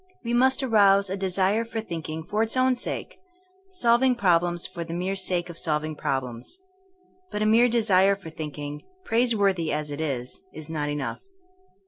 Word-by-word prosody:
We 235 0 -2
must 260 +2 +3
arouse 200 -5 +4
a - - 0
de 190 -1 -2
sire 195 +4 +2
for 230 0 -5
thinking 160 -6 -5
for 210 +6 -1
its 225 +3 0
own 255 0 +3
sake; 245 - -5 0.5
solving 250 -7 +3
prob 180 -7 +3
lems 175 0 -2
for 175 -2 -6
the 165 0 -6
mere 185 +2 -2
sake 180 -2 0
of 170 -1 -7
solving 155 -1 -1
problems. 130 - -4 0.7
But 210 - -2
a - - +1
mere 230 +3 +5
desire 200 -4 +3
for 190 -5 -11
thinking, 150 -1 -6 0.2
praiseworthy 205 - +2
as 150 0 -2
it 145 +2 -4
is, 130 - -3
is 155 0 -7
not 150 -2 -2
enough. 145 - -4
185 Hz, 175 wpm, -25 LUFS, 155-225 Hz, 0.7 s, mere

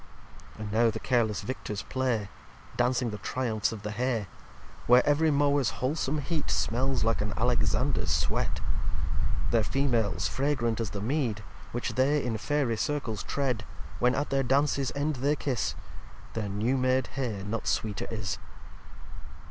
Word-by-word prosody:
liv - - -17
And 105 -1 -4
now 115 +2 +4
the - - -3
careless 115 -5 +1
Victors 105 -5 -4
play, 125 -6 0 0.5
Dancing 125 -1 +2
the 105 - -5
Triumphs 110 0 -1
of 110 -2 -7
the 105 - -3
Hay; 120 -1 0 0.6
Where 125 +1 +7
every 150 +2 +4
Mowers 140 -6 +3
wholesome 140 +4 0
Heat 155 -3 -2
Smells 115 - +1
like 115 -1 +1
an 105 -1 -2
Alexanders 120 -1 +1
Sweat. - - 0 0.9
Their 115 -1 +4
Females 115 -5 +1
fragrant 130 -5 0
as 115 -3 -1
the 100 +1 -5
Mead 115 -3 0 0.3
Which 120 - -2
they 140 +3 +3
in 120 -2 0
Fairy 140 -3 +1
Circles 120 -4 -1
tread: 125 -6 -1 0.4
When 125 +1 +3
at 145 +2 -1
their 135 0 +3
Dances 135 +1 +2
End 145 0 0
they 140 +4 +2
kiss, 135 -4 -1 0.6
Their 110 -3 -2
new 110 +7 +1
made 130 0 +2
Hay 115 -7 -2
not 105 +3 -3
sweeter 105 -2 -1
is. 95 -5 -3
125 Hz, 150 wpm, -29 LUFS, 110-135 Hz, 0.9 s, Where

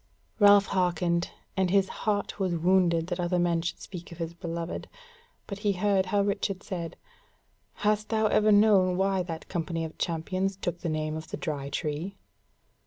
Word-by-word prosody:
Ralph 205 -1 +7
hearkened, 175 -2 0 0.3
and 190 -1 +1
his 195 +1 +3
heart 205 0 -2
was 185 -3 0
wounded 170 -1 +3
that 175 0 -4
other 175 +1 0
men 175 -1 +2
should 165 0 -4
speak 175 -3 -9
of 170 - -9
his 165 -1 -4
beloved: 170 -1 -5 0.6
but 200 -1 -6
he 205 -1 +1
heard 190 0 +1
how 200 +1 +2
Richard 200 -1 -1
said: 170 -5 -5 0.9
"Hast 210 0 +2
thou 220 -1 +2
ever 215 0 +4
known 200 -3 +5
why 195 0 +2
that 165 -2 -6
company 165 -2 -2
of 160 - -10
champions 185 +4 -1
took 175 -2 -3
the 170 - -3
name 155 0 -2
of 160 0 -6
the - - -4
Dry 145 -4 -3
Tree?" 155 +6 -3
180 Hz, 175 wpm, -28 LUFS, 170-200 Hz, 0.9 s, Ralph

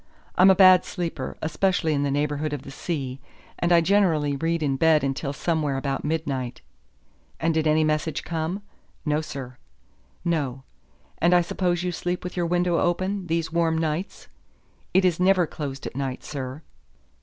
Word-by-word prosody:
I'm 185 +2 +7
a 190 - +7
bad 185 -1 +7
sleeper, 165 -7 -4
especially 160 0 +1
in 140 - 0
the 145 - 0
neighborhood 145 +1 -1
of 145 - -4
the 135 - -9
sea, 135 -4 -4 0.4
and 175 - +1
I 170 -1 +6
generally 165 -6 +2
read 165 +3 -1
in 140 -2 +1
bed 155 +1 +4
until 140 +1 -2
somewhere 150 -1 -1
about 135 0 -2
midnight." 140 -6 -2 0.8
"And 165 0 +1
did 160 0 +1
any 155 +1 +4
message 155 0 -1
come?" 170 +4 -3 0.4
"No, 150 0 +1
sir." 130 -4 -7 0.7
"No. 140 -6 -1 0.6
And 175 +2 +4
I 175 - +6
suppose 175 0 -1
you 180 - -1
sleep 180 +1 -3
with 180 - -6
your 175 -2 0
window 175 0 +1
open, 185 +2 -1
these 165 -1 -1
warm 165 -1 +2
nights." 160 +4 -3 0.6
"It 190 0 +4
is 180 -2 +2
never 185 -1 +4
closed 140 -4 -6
at - - -6
night, 135 -2 -3
sir." 135 +1 -6
160 Hz, 165 wpm, -25 LUFS, 145-175 Hz, 0.8 s, I'm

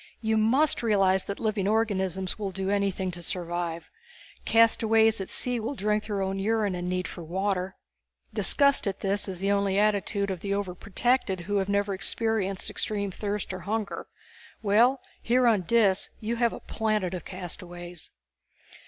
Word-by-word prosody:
You 220 -1 0
must 255 +8 +3
realize 195 -4 +3
that 200 - -5
living 215 -3 0
organisms 190 -4 0
will 200 -2 -2
do 190 +1 -2
anything 195 -2 0
to 175 0 -7
survive. 170 -1 -3 0.6
Castaways 225 -1 +4
at 190 - -6
sea 245 -1 -1
will 230 +6 -3
drink 210 -1 0
their 200 -2 -1
own 190 0 -2
urine 210 -1 +1
in 175 0 -4
their - - -2
need 180 0 -1
for 175 - -8
water. 185 +2 -2 0.6
Disgust 280 -6 +4
at 195 -1 -3
this 200 +1 0
is 190 -1 -6
only 200 -1 +2
the 195 - +2
attitude 200 -1 +1
of 185 - -4
the 200 +3 -2
overprotected 200 +2 0
who 205 +4 -1
have 195 0 0
never 200 0 +1
experienced 195 -1 -1
extreme 200 -2 -2
thirst 205 0 -4
or 185 - -5
hunger. 210 +3 -3 0.6
Well, 235 +6 +4 0.2
here 250 +2 +2
on 220 -5 +4
Dis 210 -5 +3
you 230 +2 -3
have 235 -1 +2
a - - -7
planet 215 -5 -1
of 180 - -5
castaways." 175 -2 -8
200 Hz, 165 wpm, -27 LUFS, 190-220 Hz, 0.6 s, Castaways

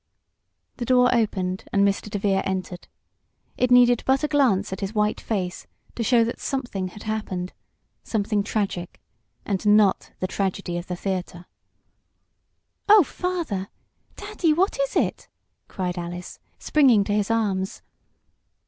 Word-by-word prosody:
The 240 - -3
door 250 0 +4
opened, 190 -5 -1
and 200 0 +4
Mr. 200 +1 -2
DeVere 200 -1 0
entered. 185 -2 -4 0.7
It 250 - +1
needed 245 -1 +6
but 265 +2 +2
a - - +2
glance 250 -11 +2
at 190 - -6
his 195 +3 -4
white 210 0 +1
face 185 -5 -3 0.3
to - - -5
show 230 +1 +4
that 235 +2 -3
something 240 -9 -3
had 205 +4 -11
happened 200 -4 -4 0.5
something 210 -1 0
tragic 200 -4 -3 0.5
and 195 -3 -2
not 210 -2 +3
the - - -1
tragedy 185 -2 -2
of 175 - -9
the 180 - -3
theater. 180 -1 -4 1.4
"Oh, 420 -2 +8
Father 325 - -3 0.5
Daddy 325 -4 0
what 380 +9 +1
is - - -1
it!" - - -1 0.4
cried 180 -1 -3
Alice, 175 +1 -7 0.2
springing 260 -9 +4
to 205 - -2
his 205 0 0
arms. 200 -4 -1
205 Hz, 140 wpm, -24 LUFS, 190-245 Hz, 1.4 s, Oh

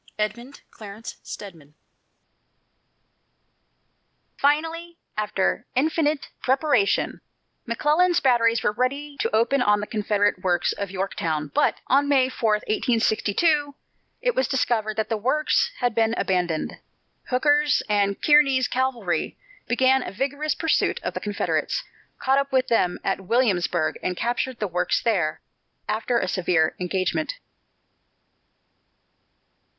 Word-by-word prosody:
EDMUND 235 +6 -4
CLARENCE 215 +1 -9
STEDMAN. 160 -7 -10 2.6
Finally, 330 +4 0 0.2
after 210 +1 -1
infinite 300 +1 0
preparation, 265 -5 +1 0.5
McClellan's 305 +9 +2
batteries 235 -3 +3
were - - +2
ready 280 +6 -2
to - - 0
open 235 +5 +2
on 210 -3 +3
the 210 - -3
Confederate 205 -3 0
works 175 -2 +1
at 200 -1 -3
Yorktown, 165 -6 -3
but - - +1
on 280 +2 +2
May 265 -2 +4
4, 230 -4 0
1862, 235 +7 +1 0.5
it - - +2
was - - +1
discovered 225 -5 0
that 220 - 0
the 225 - 0
works 305 - +1
had 245 -2 +1
been 225 0 +1
abandoned. 175 -4 -1 0.5
Hooker's 290 +3 +2
and 200 -1 +1
Kearny's 275 -4 +4
cavalry 245 -10 -1 0.3
began 260 +2 +3
a - - -5
vigorous 285 +8 -2
pursuit 320 - +1
of - - -3
the - - -3
Confederates, 210 - -1 0.3
caught 265 +1 +2
up 280 0 -2
with 260 -1 +1
them 180 -6 +2
at 195 0 -1
Williamsburg 180 -7 +1
and 180 -1 -2
captured 245 +1 -2
the 210 - -2
works 180 0 0
there, 180 -10 0 0.5
after 225 +3 0
a 190 - 0
severe 175 -3 +1
engagement. 185 - -1
235 Hz, 120 wpm, -24 LUFS, 200-275 Hz, 2.6 s, May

